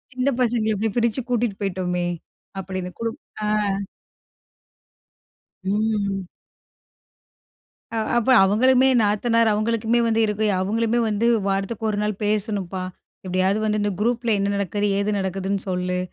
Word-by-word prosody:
சின்ன 255 +2 +1
பசங்கள 225 -3 +1
போய் 220 -1 -1
பிரிச்சு 235 +2 +1
கூட்டிட்டு 235 -4 0
போயிட்டோமே, 180 -2 -1 0.5
அப்படின்னு. 185 -1 -5
குடு 230 0 -1 0.3
ஆ. - - 0 2.2
ம். 200 -2 0 1.7
ஆ, - - -2 0.2
அப்ப 240 +3 +1
அவங்களுமே 255 +6 +4
நாத்தனார் 225 +2 +2
அவங்களுக்குமே 230 +2 +1
வந்து 225 0 +2
இருக்கு. 210 +1 0
அவங்களுமே 225 +4 0
வந்து 215 +2 0 0.2
"வாரத்துக்கு 195 +3 -2
1 205 - -2
நாள் 210 0 0
பேசணும்ப்பா, 200 -3 -1 0.4
எப்படியாவது 185 +3 +1
வந்து 215 0 +1
இந்த 205 0 0
குரூப்பில 235 +1 0
என்ன 200 0 0
நடக்குது 200 +1 -1
ஏது 205 +1 0
நடக்குதுன்னு 190 +1 -2
சொல்லு." 180 0 -1
210 Hz, 120 wpm, -23 LUFS, 195-230 Hz, 2.2 s, அவங்களுமே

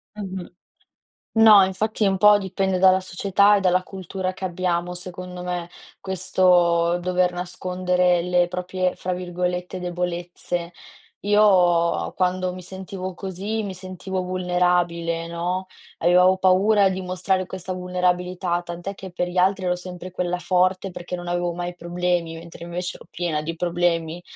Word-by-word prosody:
Mh-mh. 190 -3 -6 0.9
No, 220 -3 +8
infatti 210 +3 -1
un 190 0 +1
po' 210 +1 +7
dipende 190 -1 -1
dalla 190 0 +6
società 200 +2 +3
e - - +2
dalla 185 0 +2
cultura 185 0 -5
che 190 - -11
abbiamo 180 -1 -1
secondo 180 0 -7
me, 175 -1 -4 0.3
questo 175 -2 +3
dover 180 0 +1
nascondere 180 0 0
le 180 -1 +2
proprie 180 0 -2
fra 185 - -3
virgolette 180 0 -3
"debolezze." 175 -1 -4 0.5
Io 180 -5 +3
quando 185 0 0
mi 185 - -8
sentivo 190 0 -7
così, 195 +4 -4
mi 195 - -4
sentivo 185 0 -5
vulnerabile, 180 -2 0
no, 180 +2 -3 0.3
avevo 180 +2 +5
paura 195 +2 +4
di 190 0 -3
mostrare 185 +1 -1
questa 185 0 -5
vulnerabilità, 180 -1 -1
tant'è 175 +3 -6
che 190 -1 -9
per 180 0 -2
gli 180 - -8
altri 190 +1 +2
ero 180 0 +1
sempre 180 0 -8
quella 180 0 -2
forte 185 +2 +1
perché 180 +1 -6
non 175 0 -8
avevo 175 0 -1
mai 175 0 -5
problemi, 175 -1 -1
mentre 165 0 -10
invece 175 +2 -4
ero - - -13
piena 170 -4 -2
di 165 +2 -4
problemi. 175 -1 -1
180 Hz, 145 wpm, -23 LUFS, 175-185 Hz, 0.9 s, No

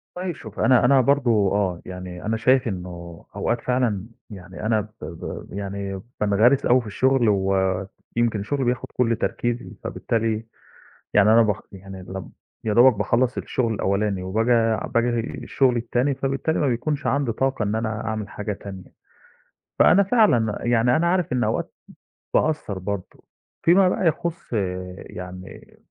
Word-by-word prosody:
طيب 180 -2 -3
شوفي 110 -6 -8
أنا 130 -2 +5
أنا 135 +1 +5
برضه، 135 -2 +2 0.2
آه، 95 -4 0
يعني، 90 -1 -8
أنا 110 +1 0
شايف 130 +3 +3
إنه 90 -4 -7
أوقات 120 - -1
فعلًا، 120 -6 0 0.2
يعني، 95 0 -9
أنا 110 -1 +2
ب 105 - -11 0.2
ب 85 - -7
يعني، 100 -1 -4 0.2
بانغرِس 110 +6 +3
أوي 125 +1 +4
في 110 - -10
الشغل 130 +2 +2
ويمكن 95 +3 0
شُغلي 135 +5 -1
بياخد 120 0 -1
كلّ 115 -2 +2
تركيزي. 120 +2 -2
فبالتالي، 115 -1 -1 0.7
يعني، 105 +1 +5
أنا 115 - +7
ب 105 -2 +3 0.2
يعني، 95 0 -10
لم 95 0 -8 0.3
يادوبك 120 +4 +5
باخلّص 120 +5 +1
الشغل 115 -3 -1
الأولاني 100 -1 0
وباجي 115 +3 +1
باجي 120 0 +2 0.2
الشغل 130 -3 +2
التاني، 120 +4 0
فبالتالي 135 +4 -1
ما 145 - +2
بيكونش 135 +4 -1
عَندي 140 -4 +1
طاقة 135 0 -1
إن 105 +1 -1
أنا 110 -1 -2
أعمل 110 -1 -3
حاجة 105 0 -4
تانية. 95 -2 -10 0.9
فأنا 195 +4 +6
فعلًا، 190 - +3
يعني، 120 +1 +3
أنا 170 +2 +1
عارف 180 -4 +1
إن 125 -1 +1
أوقات - - -2 0.6
باقصّر 150 -11 0
برضه 100 0 -6 0.4
فيما 185 +2 +5
بقى 180 0 +1
يخُصّ، 170 -2 -2 0.5
يعني، 90 0 -10
115 Hz, 145 wpm, -23 LUFS, 100-130 Hz, 0.9 s, أنا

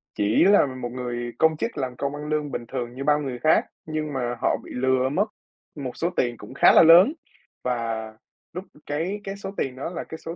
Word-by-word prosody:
chỉ 105 +2 +3
là 200 -4 +6
một 130 -2 -5
người 120 -1 -4
công 160 -1 +3
chức - - -3
làm 130 -3 -3
công 140 +3 -3
ăn 150 0 -7
lương 150 -2 -1
bình 120 - -4
thường 120 -1 -5
như 135 - -5
bao 150 +1 +3
người 130 -4 -4
khác, 155 +4 +3 0.2
nhưng 155 -1 -3
mà 120 -2 -2
họ - - +2
bị - - -12
lừa 130 +1 +1
mất 185 +9 +1 0.5
một 135 -4 -6
số 170 - 0
tiền 120 -2 0
cũng 105 - -11
khá - - +6
là - - +8
lớn, 175 - +8 0.5
và 115 -3 -2 0.4
lúc 180 +3 -5 0.2
cái 165 +8 -2
cái 195 0 -5
số 200 -1 -7
tiền 130 -2 -2
đó 135 - -5
là 175 - -5
cái 160 - -9
số 165 +1 -7
135 Hz, 225 wpm, -24 LUFS, 125-160 Hz, 0.5 s, là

